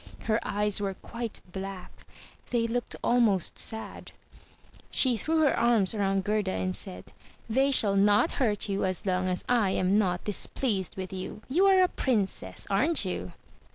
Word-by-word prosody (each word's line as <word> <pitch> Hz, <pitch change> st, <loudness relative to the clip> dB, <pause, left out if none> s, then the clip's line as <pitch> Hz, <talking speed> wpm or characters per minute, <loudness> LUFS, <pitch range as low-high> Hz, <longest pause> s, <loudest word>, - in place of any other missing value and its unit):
Her 220 Hz, 0 st, +1 dB
eyes 210 Hz, 0 st, 0 dB
were 195 Hz, -1 st, -2 dB
quite 235 Hz, +2 st, -6 dB
black; 190 Hz, 0 st, -7 dB, 0.6 s
they 235 Hz, -2 st, +1 dB
looked 240 Hz, +1 st, -2 dB
almost 225 Hz, -7 st, +2 dB
sad. 220 Hz, -1 st, -6 dB, 0.8 s
She 255 Hz, -3 st, +3 dB
threw 315 Hz, +8 st, 0 dB
her 295 Hz, -, +3 dB
arms 230 Hz, -5 st, +2 dB
around 195 Hz, -2 st, 0 dB
Gerda 210 Hz, -, 0 dB
and 95 Hz, 0 st, -2 dB
said, 95 Hz, +2 st, -6 dB, 0.3 s
"They 265 Hz, +5 st, +2 dB
shall 210 Hz, -7 st, +5 dB
not 205 Hz, +9 st, +4 dB
hurt 215 Hz, -3 st, +1 dB
you 200 Hz, -1 st, -1 dB
as 185 Hz, 0 st, -2 dB
long 185 Hz, -1 st, 0 dB
as 180 Hz, -, -1 dB
I 235 Hz, -5 st, +2 dB
am 185 Hz, +1 st, +1 dB
not 185 Hz, -4 st, +1 dB
displeased 205 Hz, -2 st, -1 dB
with 185 Hz, 0 st, -5 dB
you. 190 Hz, +3 st, -7 dB
You 360 Hz, +9 st, +3 dB
are 380 Hz, -1 st, +6 dB
a -, -, +4 dB
princess, 220 Hz, -, -2 dB
aren't 265 Hz, +6 st, +2 dB
you?" 90 Hz, -, -4 dB
205 Hz, 160 wpm, -28 LUFS, 190-235 Hz, 0.8 s, are